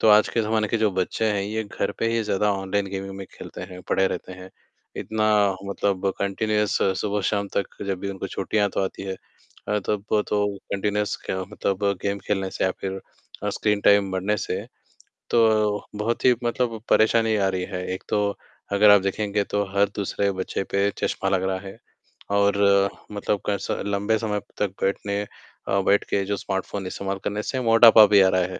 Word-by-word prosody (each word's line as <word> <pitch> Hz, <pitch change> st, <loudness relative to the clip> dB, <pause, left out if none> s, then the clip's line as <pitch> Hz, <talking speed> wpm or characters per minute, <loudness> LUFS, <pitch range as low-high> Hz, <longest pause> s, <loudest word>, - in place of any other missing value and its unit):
तो -, -, +4 dB
आज 105 Hz, 0 st, +6 dB
के 115 Hz, -, 0 dB
ज़माने 110 Hz, 0 st, 0 dB
के 115 Hz, -, +1 dB
जो 110 Hz, -1 st, +2 dB
बच्चे 95 Hz, +4 st, -1 dB
हैं 100 Hz, -1 st, -1 dB
ये 110 Hz, +2 st, -2 dB
घर 100 Hz, -, -3 dB
पे 115 Hz, -, 0 dB
ही 115 Hz, 0 st, +1 dB
ज़्यादा 105 Hz, 0 st, +1 dB
ऑनलाइन 100 Hz, +1 st, -1 dB
गेमिंग 95 Hz, 0 st, -5 dB
में 95 Hz, -1 st, -7 dB
खेलते -, -, -9 dB
हैं, 90 Hz, 0 st, -9 dB
पड़े 95 Hz, -, +3 dB
रहते 95 Hz, -, -5 dB
हैं, 95 Hz, 0 st, -11 dB, 0.5 s
इतना 110 Hz, 0 st, -2 dB, 0.4 s
मतलब 100 Hz, -1 st, -1 dB
कंटिन्यूअस 105 Hz, +1 st, 0 dB, 0.2 s
सुबह-शाम 100 Hz, 0 st, -1 dB
तक 100 Hz, -, -3 dB
जब 95 Hz, -2 st, -2 dB
भी 100 Hz, -, -3 dB
उनको 95 Hz, 0 st, -5 dB
छुट्टियाँ 100 Hz, +2 st, 0 dB
तो -, -, +1 dB
आती 95 Hz, -, -5 dB
हैं। 95 Hz, -1 st, -4 dB, 0.5 s
अ, 105 Hz, -, +1 dB
तब 105 Hz, -2 st, -1 dB, 0.2 s
तो 105 Hz, 0 st, +1 dB, 0.3 s
कंटिन्यूअस 105 Hz, +1 st, 0 dB
क 95 Hz, 0 st, -2 dB
मतलब 100 Hz, +1 st, -2 dB, 0.2 s
गेम 100 Hz, 0 st, -1 dB
खेलने 95 Hz, -2 st, -1 dB
से -, -, -2 dB
या 95 Hz, -, +2 dB
फ़िर 95 Hz, 0 st, -4 dB, 0.4 s
अ, -, -, -1 dB
स्क्रीन 105 Hz, -1 st, 0 dB
टाइम 100 Hz, -1 st, +4 dB
बढ़ने 95 Hz, +3 st, 0 dB
से। -, -, -3 dB, 0.6 s
तो 110 Hz, -3 st, +3 dB
बहुत 110 Hz, +3 st, -2 dB
ही 125 Hz, -1 st, +6 dB
मतलब 120 Hz, -1 st, -1 dB
परेशानी 110 Hz, 0 st, +4 dB
आ 100 Hz, -2 st, +2 dB
रही 95 Hz, -1 st, -2 dB
है, 90 Hz, -1 st, -5 dB
एक 95 Hz, -, -7 dB
तो 105 Hz, -1 st, 0 dB, 0.4 s
अगर 105 Hz, +1 st, +6 dB
आप 105 Hz, -1 st, +8 dB
देखेंगे 100 Hz, +1 st, -1 dB
तो 105 Hz, +1 st, -1 dB
हर 100 Hz, +1 st, +4 dB
दूसरे 100 Hz, 0 st, 0 dB
बच्चे 95 Hz, +1 st, -3 dB
पे 100 Hz, +1 st, +2 dB
चश्मा 95 Hz, -, -1 dB
लग 95 Hz, -1 st, +1 dB
रहा 95 Hz, -, -1 dB
है। 95 Hz, -, -11 dB, 0.5 s
और 100 Hz, 0 st, +3 dB, 0.5 s
मतलब 105 Hz, 0 st, -1 dB
कैसा 100 Hz, -1 st, -1 dB
लंबे 100 Hz, +2 st, +1 dB
समय 105 Hz, -2 st, -1 dB, 0.2 s
तक 105 Hz, -, +1 dB
बैठने 100 Hz, +1 st, -1 dB, 0.5 s
अ, 100 Hz, -, +2 dB
बैठ 100 Hz, +1 st, +3 dB
के 100 Hz, -, +1 dB
जो 100 Hz, +1 st, -1 dB
स्मार्टफ़ोन 95 Hz, 0 st, -4 dB
इस्तेमाल 95 Hz, +1 st, -3 dB
करने 105 Hz, +1 st, -1 dB
से 130 Hz, -, -2 dB
मोटापा 115 Hz, -2 st, +8 dB
भी 100 Hz, -1 st, +6 dB
आ 95 Hz, -, +5 dB
रहा 95 Hz, 0 st, +2 dB
है। -, -, -6 dB
100 Hz, 190 wpm, -24 LUFS, 95-105 Hz, 0.6 s, आप